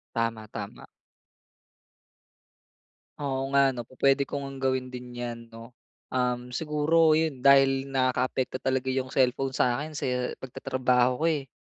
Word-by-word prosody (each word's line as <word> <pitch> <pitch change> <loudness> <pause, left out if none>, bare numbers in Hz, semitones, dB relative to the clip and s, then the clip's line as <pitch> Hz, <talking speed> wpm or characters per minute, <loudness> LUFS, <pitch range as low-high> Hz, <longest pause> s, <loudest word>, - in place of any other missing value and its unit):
Tama, 115 -2 -2
tama. 105 -2 -8 2.3
Oo 135 -2 -2
nga 140 -1 +5
'no, 120 -3 -7
pupuwede 135 +1 +2
ko 140 - -4
ngang 135 -1 -7
gawin 130 -1 0
din 125 -1 -9
'yan, 120 -1 -5
'no? 115 +2 -12 0.4
Um, 125 -1 -1
siguro 155 +3 +3
'yon, 155 -4 0
dahil 135 0 +5
nakaapekto 130 -1 0
talaga 130 0 -1
'yong 130 0 -1
cellphone 130 0 +1
sa 120 0 +2
akin 155 +1 -6
sa - - -3 0.3
pagtatrabaho 125 0 0
ko, - - +3
eh. 145 -4 -3
130 Hz, 135 wpm, -27 LUFS, 125-140 Hz, 2.3 s, nga